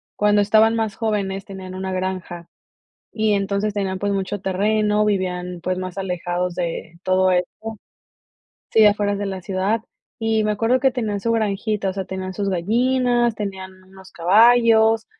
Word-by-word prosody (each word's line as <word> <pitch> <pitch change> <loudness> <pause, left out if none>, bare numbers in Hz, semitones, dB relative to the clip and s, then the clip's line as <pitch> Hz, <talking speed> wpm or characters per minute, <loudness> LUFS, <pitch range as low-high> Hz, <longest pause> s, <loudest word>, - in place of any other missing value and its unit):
cuando 210 0 +3
estaban 220 +2 +4
más 220 -3 -1
jóvenes 195 -3 -2
tenían 190 -2 -8
una 190 0 -4
granja 185 -2 -4 0.6
y 215 -1 +1
entonces 200 +1 -1
tenían 190 -2 -2
pues 200 +1 -1
mucho 195 +1 -2
terreno, 210 +2 +1
vivían 180 -3 -2
pues 185 0 -2
más 185 0 -6
alejados 180 -1 -2
de 170 -1 -4
todo 185 0 +3
esto 200 +5 -2 1.0
sí, 220 -1 +6
afuera 205 -1 +2
de 205 0 -3
la 190 -1 -4
ciudad 195 +4 -1 0.4
y 225 -1 +1
me 210 - +1
acuerdo 225 +5 +1
que 265 - +4
tenían 215 -5 -2
su 230 - -1
granjita. 210 -2 -1
O - - -5
sea, 190 0 -4
tenían 190 0 -5
sus 200 +1 -2
gallinas, 240 +5 +1
tenían 190 -3 -6
unos 190 0 -16
caballos 225 +4 +4
200 Hz, 160 wpm, -21 LUFS, 185-220 Hz, 1.0 s, sí